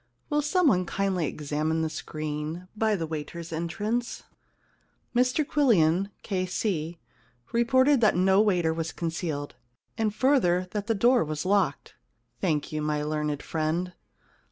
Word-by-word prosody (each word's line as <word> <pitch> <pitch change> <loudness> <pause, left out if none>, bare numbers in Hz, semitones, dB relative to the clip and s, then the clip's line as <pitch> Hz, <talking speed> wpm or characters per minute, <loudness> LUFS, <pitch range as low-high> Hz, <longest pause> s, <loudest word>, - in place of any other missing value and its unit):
Will 295 0 +3
somebody 295 - +3
kindly 185 -3 -1
examine 155 +3 -1
the - - +1
screen 155 +4 -5
by 220 0 +2
the 165 -4 -2
waiters* 160 +2 -6
entrance? 210 +9 -2 0.4
* - - -40
Mr 255 +5 +2
Quillian, 195 - +3
K.C., 185 -3 -2 0.5
reported 260 +3 +4
that 215 - +4
no 190 +2 +4
waiter 180 -6 +2
was 165 0 -3
concealed, 160 -3 -3 0.5
and 220 -1 +2
further 200 -7 +2
that 205 -1 -3
the 225 - +1
door 240 +5 +4
was 155 +1 -4
locked. 185 -8 +1 0.2
* - - -44
Thank 155 -6 0
you, 155 0 -2
my 150 0 -1
learned 150 -1 -2
friend. 165 +3 -2
180 Hz, 135 wpm, -27 LUFS, 155-220 Hz, 0.5 s, reported